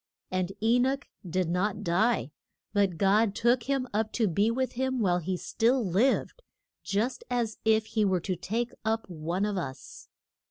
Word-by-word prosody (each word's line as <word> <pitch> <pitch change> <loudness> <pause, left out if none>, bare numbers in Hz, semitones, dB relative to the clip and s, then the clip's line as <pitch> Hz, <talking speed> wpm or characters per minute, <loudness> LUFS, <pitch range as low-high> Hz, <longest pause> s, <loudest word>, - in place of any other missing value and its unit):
And 185 0 -1
E 235 +2 +4
noch 270 +3 +1 0.3
did 185 +1 0
not 185 +4 -1
die, 175 - +1 0.4
but 200 -4 +2
God 200 +2 +3
took 240 +1 +3
him 270 -2 +1
up 215 +1 0
to 225 -3 +2
be 200 +5 +2
with 260 +2 -1
him 260 +1 -1
while 180 -5 +2
he 180 +2 -2
still 235 +5 +1
lived, 230 - +1 0.4
just 220 +6 -1
as 235 -3 -1
if 220 0 +4
he 220 -1 0
were 190 -3 +2
to 185 +1 -2
take 230 +7 -2
up 225 0 -1
one 170 +4 -2
of 205 -2 -2
us. 135 -7 -7
215 Hz, 170 wpm, -28 LUFS, 185-235 Hz, 0.4 s, E